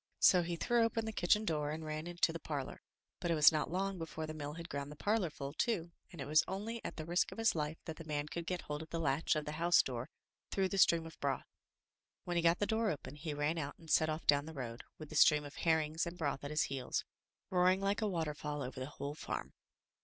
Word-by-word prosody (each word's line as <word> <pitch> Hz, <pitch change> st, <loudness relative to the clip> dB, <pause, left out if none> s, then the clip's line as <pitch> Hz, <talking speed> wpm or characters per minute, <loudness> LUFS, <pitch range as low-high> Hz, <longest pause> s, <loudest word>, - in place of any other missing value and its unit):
So 180 Hz, -, +6 dB
he 170 Hz, 0 st, -2 dB
threw 235 Hz, +7 st, +2 dB
open 225 Hz, 0 st, 0 dB
the 220 Hz, -, -2 dB
kitchen 210 Hz, +3 st, +3 dB
door 150 Hz, -5 st, 0 dB
and 155 Hz, +1 st, -4 dB
ran 155 Hz, +1 st, -4 dB
into 175 Hz, -1 st, +1 dB
the 165 Hz, -, -4 dB
parlor, 145 Hz, -4 st, -4 dB, 0.4 s
but 175 Hz, -, -2 dB
it 165 Hz, -, +3 dB
was 150 Hz, 0 st, +8 dB
not 155 Hz, -1 st, 0 dB
long 190 Hz, +1 st, -1 dB
before 160 Hz, -1 st, -4 dB
the 155 Hz, -, -5 dB
mill 150 Hz, -1 st, -5 dB
had 170 Hz, +1 st, -7 dB
ground 140 Hz, -2 st, -4 dB
the -, -, -8 dB
parlor 205 Hz, +1 st, +1 dB
full 140 Hz, -2 st, -6 dB
too, 175 Hz, -3 st, 0 dB, 0.2 s
and 175 Hz, -, -11 dB
it 135 Hz, -, -3 dB
was 155 Hz, +2 st, +5 dB
only 220 Hz, +4 st, -4 dB
at -, -, -5 dB
the 155 Hz, -, -5 dB
risk 175 Hz, +2 st, +1 dB
of -, -, -9 dB
his 225 Hz, 0 st, +3 dB
life 155 Hz, 0 st, -2 dB
that 160 Hz, -2 st, -6 dB
the 165 Hz, -, -7 dB
man 150 Hz, -1 st, -2 dB
could 170 Hz, +2 st, -5 dB
get 180 Hz, -1 st, -2 dB
hold 150 Hz, 0 st, -4 dB
of 160 Hz, -, -9 dB
the 165 Hz, -, -2 dB
latch 150 Hz, +1 st, +2 dB
of 150 Hz, -1 st, -1 dB
the 150 Hz, -, -3 dB
housedoor 155 Hz, -6 st, +2 dB, 0.4 s
through 190 Hz, -1 st, +1 dB
the 195 Hz, -, -1 dB
stream 165 Hz, -2 st, +5 dB
of 165 Hz, -, -11 dB
broth. 140 Hz, -1 st, -1 dB, 0.8 s
When 175 Hz, -, -3 dB
he 170 Hz, -, +3 dB
got 165 Hz, +1 st, +4 dB
the 205 Hz, -, +1 dB
door 220 Hz, 0 st, +1 dB
open, 145 Hz, -4 st, -5 dB
he 150 Hz, 0 st, -4 dB
ran 150 Hz, +3 st, 0 dB
out 140 Hz, -1 st, -4 dB
and 160 Hz, -2 st, -9 dB
set 155 Hz, -, +4 dB
off 155 Hz, +1 st, -3 dB
down 145 Hz, 0 st, +4 dB
the 160 Hz, 0 st, -8 dB
road, 120 Hz, -3 st, -5 dB, 0.2 s
with 155 Hz, -2 st, -9 dB
the 155 Hz, -, -8 dB
stream 150 Hz, 0 st, +6 dB
of 145 Hz, +3 st, -10 dB
herrings 160 Hz, 0 st, +1 dB
and 170 Hz, +1 st, -6 dB
broth 145 Hz, -5 st, -2 dB
at 145 Hz, -, -4 dB
his 150 Hz, +1 st, +2 dB
heels, 135 Hz, -2 st, -2 dB, 0.5 s
roaring 185 Hz, +1 st, +4 dB
like 200 Hz, +2 st, 0 dB
a 215 Hz, -, +2 dB
waterfall 150 Hz, -4 st, -2 dB
over 130 Hz, +1 st, -6 dB
the 130 Hz, -, -3 dB
whole 145 Hz, 0 st, -5 dB
farm. 155 Hz, -, -5 dB
160 Hz, 255 wpm, -35 LUFS, 150-175 Hz, 0.8 s, was